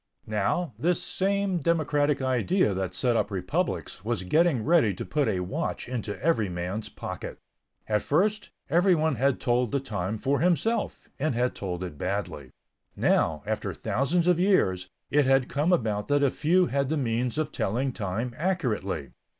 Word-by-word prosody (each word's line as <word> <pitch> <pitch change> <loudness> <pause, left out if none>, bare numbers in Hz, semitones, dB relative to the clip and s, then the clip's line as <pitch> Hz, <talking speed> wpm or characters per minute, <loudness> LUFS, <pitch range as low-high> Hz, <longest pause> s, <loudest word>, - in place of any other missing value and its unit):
Now, 110 - -1
this 175 +6 +2
same 195 0 0
democratic 145 -3 +1
idea 130 - +2
that 95 -1 -3
set 120 -2 +1
up - - +1
republics 90 -2 -2
was 110 -4 -1
getting 150 - +2
ready 150 - +4
to - - -5
put 145 -3 0
a 95 -4 0
watch 90 - -3
into 115 -4 -4
every 140 - +2
man's 90 +5 -4
pocket. - - -7 0.5
At 105 -1 +1
first, 205 +7 +1 0.2
everyone 170 -3 +3
had 135 +2 +2
told 120 -2 +1
the 140 - +1
time 105 -6 -3
for 140 +5 0
himself, 180 - 0
and 145 -2 0
had 125 +1 +1
told 90 -2 -4
it 75 -6 -7
badly. 90 -8 -3 0.5
Now, 75 -3 +1
after - - -3
thousands 165 +7 0
of 175 -1 +3
years, 95 - +2 0.2
it 145 0 +4
had 135 -1 +3
come 150 +5 +1
about 110 - 0
that 145 0 +2
a 140 - +3
few 180 +4 +3
had 140 -3 -1
the 160 - 0
means 125 0 -1
of 155 -1 -1
telling 125 +7 -1
time 110 +3 -3
accurately. 120 - -1
130 Hz, 165 wpm, -27 LUFS, 105-160 Hz, 0.5 s, ready